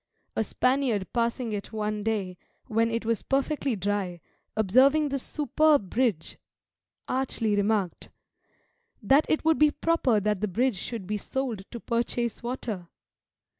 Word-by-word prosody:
A -, -, +1 dB
Spaniard 250 Hz, -4 st, 0 dB
passing 235 Hz, -1 st, 0 dB
it 205 Hz, 0 st, -5 dB
one 215 Hz, -1 st, -2 dB
day, 205 Hz, -4 st, -1 dB, 0.3 s
when 225 Hz, +1 st, +1 dB
it 230 Hz, 0 st, -2 dB
was 230 Hz, -1 st, 0 dB
perfectly 275 Hz, -1 st, 0 dB
dry, 195 Hz, -2 st, -2 dB, 0.4 s
observing 265 Hz, +9 st, +4 dB
this 275 Hz, -1 st, -2 dB
superb 295 Hz, -, +2 dB
bridge, 230 Hz, -10 st, 0 dB, 0.7 s
archly 245 Hz, -5 st, 0 dB
remarked, 205 Hz, -3 st, 0 dB, 0.9 s
"That 270 Hz, +9 st, +4 dB
it 315 Hz, -, +1 dB
would 320 Hz, -1 st, +3 dB
be 300 Hz, 0 st, +6 dB
proper 295 Hz, -7 st, +2 dB
that 210 Hz, -1 st, 0 dB
the 215 Hz, -, +1 dB
bridge 235 Hz, +3 st, +1 dB
should 220 Hz, +1 st, -5 dB
be 210 Hz, +3 st, -2 dB
sold 245 Hz, -1 st, -3 dB
to 235 Hz, -, -7 dB
purchase 235 Hz, 0 st, -1 dB
water." 235 Hz, -7 st, -4 dB
230 Hz, 135 wpm, -27 LUFS, 205-265 Hz, 0.9 s, be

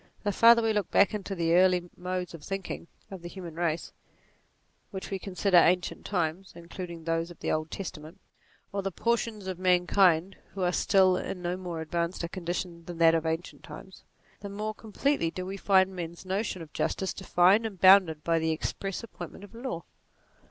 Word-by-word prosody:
The 205 Hz, -, +1 dB
farther 230 Hz, +3 st, +6 dB
we 225 Hz, -1 st, +2 dB
look 210 Hz, -4 st, -1 dB
back 200 Hz, -, +4 dB
into 200 Hz, -1 st, -4 dB
the 165 Hz, -2 st, +1 dB
early 180 Hz, 0 st, +4 dB
modes 180 Hz, -1 st, -4 dB
of 165 Hz, -3 st, -10 dB
thinking 195 Hz, -2 st, -5 dB, 0.2 s
of 190 Hz, -2 st, -8 dB
the 175 Hz, -, -7 dB
human 175 Hz, -3 st, -8 dB
race, 165 Hz, -1 st, -2 dB, 1.0 s
whether 190 Hz, -3 st, -6 dB
we 195 Hz, -, -2 dB
consider 185 Hz, 0 st, +1 dB
ancient 175 Hz, +1 st, +3 dB
times 180 Hz, 0 st, -2 dB
(including 170 Hz, 0 st, -8 dB
those 165 Hz, +1 st, -1 dB
of 175 Hz, -, -13 dB
the -, -, -2 dB
Old 155 Hz, 0 st, -1 dB
Testament) 165 Hz, -4 st, -7 dB, 0.5 s
or 200 Hz, -, -1 dB
the 195 Hz, 0 st, -3 dB
portions 230 Hz, 0 st, -1 dB
of 185 Hz, -2 st, -5 dB
mankind 180 Hz, 0 st, +3 dB, 0.2 s
who 190 Hz, -, -2 dB
are 180 Hz, -, +2 dB
still 185 Hz, 0 st, +4 dB
in 180 Hz, -1 st, -5 dB
no 175 Hz, +1 st, -1 dB
more 175 Hz, -3 st, -5 dB
advanced 170 Hz, +2 st, -2 dB
a -, -, -1 dB
condition 175 Hz, -1 st, -4 dB
than 175 Hz, -1 st, -7 dB
that 165 Hz, -1 st, +6 dB
of 165 Hz, -1 st, 0 dB
ancient 165 Hz, +2 st, -3 dB
times, 190 Hz, -1 st, -11 dB, 0.4 s
the 200 Hz, -, -7 dB
more 210 Hz, +2 st, -4 dB
completely 220 Hz, -, -1 dB
do 180 Hz, +2 st, -6 dB
we 190 Hz, +1 st, -5 dB
find 190 Hz, -1 st, +3 dB
men's 170 Hz, 0 st, -7 dB
notions 190 Hz, -2 st, -2 dB
of 155 Hz, -, -15 dB
justice 190 Hz, -, -1 dB
defined 190 Hz, +4 st, +3 dB
and 195 Hz, -4 st, -10 dB
bounded 185 Hz, -5 st, +6 dB
by 165 Hz, -1 st, +2 dB
the 160 Hz, 0 st, 0 dB
express 195 Hz, +6 st, -3 dB
ap 230 Hz, -, -10 dB
pointment -, -, -9 dB
of 205 Hz, -, -13 dB
law. 230 Hz, -8 st, -5 dB
180 Hz, 190 wpm, -28 LUFS, 170-195 Hz, 1.0 s, farther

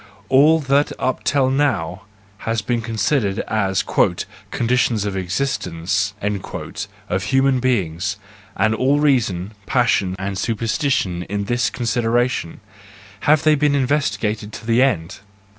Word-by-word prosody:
All 150 Hz, +5 st, +5 dB
that 140 Hz, +1 st, +2 dB
up 130 Hz, -, -1 dB
till 135 Hz, -3 st, +2 dB
now 100 Hz, -, 0 dB, 0.3 s
has 115 Hz, -1 st, -2 dB
been 120 Hz, 0 st, -1 dB
considered 110 Hz, -1 st, 0 dB
as 95 Hz, -3 st, 0 dB
the -, -, +1 dB
" -, -, -24 dB
conditions 120 Hz, -3 st, +1 dB
of 100 Hz, -2 st, -2 dB
existence," 95 Hz, -1 st, -1 dB, 0.9 s
of 95 Hz, 0 st, -1 dB
human 135 Hz, +4 st, +2 dB
beings, 95 Hz, -7 st, -1 dB, 0.4 s
and 110 Hz, +3 st, +2 dB
all 135 Hz, +6 st, +2 dB
reason, 110 Hz, -10 st, +1 dB, 0.2 s
passion 115 Hz, -7 st, +2 dB
and 95 Hz, 0 st, -4 dB
superstition 115 Hz, -, 0 dB
in 100 Hz, 0 st, -2 dB
this 120 Hz, +4 st, 0 dB
considera¬ 120 Hz, 0 st, +1 dB
tion—have 105 Hz, -, -3 dB
they 155 Hz, -, +5 dB
been 150 Hz, -1 st, +2 dB
investigated 110 Hz, -6 st, 0 dB
to -, -, -8 dB
the 115 Hz, +2 st, +3 dB
end? 95 Hz, -9 st, 0 dB
115 Hz, 125 wpm, -20 LUFS, 100-130 Hz, 0.9 s, All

